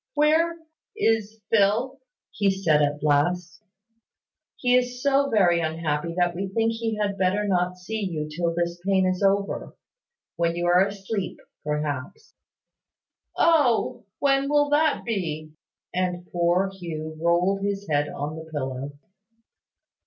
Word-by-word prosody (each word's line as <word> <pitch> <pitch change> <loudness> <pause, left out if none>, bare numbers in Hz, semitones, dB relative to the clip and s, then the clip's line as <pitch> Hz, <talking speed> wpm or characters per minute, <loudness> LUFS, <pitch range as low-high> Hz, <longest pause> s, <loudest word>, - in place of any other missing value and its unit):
"Where 320 +3 +3 0.4
is 225 - 0
Phil?" 225 +5 +2 0.3
he 200 -2 +1
said 170 -6 +2
at 145 0 0
last. 175 +6 +1 0.9
"He 250 -1 +2
is 250 0 +1
so 280 +1 +2
very 180 -6 +4
unhappy, 160 0 -2
that 175 -1 +2
we 195 +2 -3
think 225 +4 +1
he 225 -1 -2
had 200 -1 -1
better 195 +3 +1
not 180 -1 0
see 220 +5 -5
you 155 -3 -3
till 170 +2 -1
this 170 0 -2
pain 190 -1 +2
is 185 +1 0
over. 200 0 0 0.6
When 170 0 +1
you 175 0 -2
are 175 +2 +5
asleep, 200 -1 -4 0.3
perhaps." 150 - -4 1.0
"Oh! 290 -11 +3
When 275 0 +2
will 290 0 +3
that 300 +1 +2
be?" 160 -9 -3 0.4
and 180 -1 -1
poor 175 +3 +1
Hugh 160 -4 -6
rolled 175 +4 +2
his 200 0 -2
head 145 -1 +1
on 145 +2 -4
the 160 0 -9
pillow. 135 -1 -4
185 Hz, 135 wpm, -25 LUFS, 165-225 Hz, 1.0 s, are